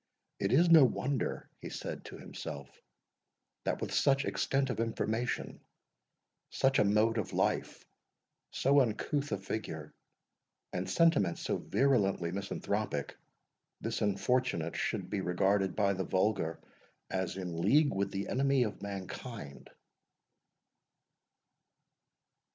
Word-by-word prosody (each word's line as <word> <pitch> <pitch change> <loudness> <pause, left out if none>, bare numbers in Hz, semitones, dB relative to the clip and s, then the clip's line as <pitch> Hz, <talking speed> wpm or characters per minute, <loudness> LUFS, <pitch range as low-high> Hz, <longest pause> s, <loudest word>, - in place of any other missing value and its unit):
"It 100 0 0
is 165 +7 +5
no 165 -3 +9
wonder," 130 0 0
he - - -7
said - - -6
to - - -9
himself, 70 -2 -8 0.8
"that - - 0
with - - -3
such 140 0 +3
extent 135 -1 0
of 110 - -4
information, 115 +1 -2 0.9
such 135 0 +2
a - - +6
mode 105 +3 +3
of 105 - -4
life, - - -1 0.6
so 140 +2 +3
uncouth 135 +5 -1
a - - +1
figure, 80 -6 -5 0.8
and 90 +1 -2
sentiments 160 - +3
so - - -1
virulently 100 -11 +1
misanthropic, 100 -4 -3 0.6
this 115 +1 -3
unfortunate 105 -4 0
should - - -2
be 100 -2 -2
regarded 95 +1 +1
by 100 -2 +2
the 95 0 -2
vulgar 95 -4 0 0.5
as 95 -1 -2
in 90 -3 -4
league 140 - +4
with 100 0 0
the 100 0 -3
Enemy 135 0 +2
of 105 - -4
Mankind." 100 - -7
105 Hz, 115 wpm, -32 LUFS, 95-130 Hz, 0.9 s, no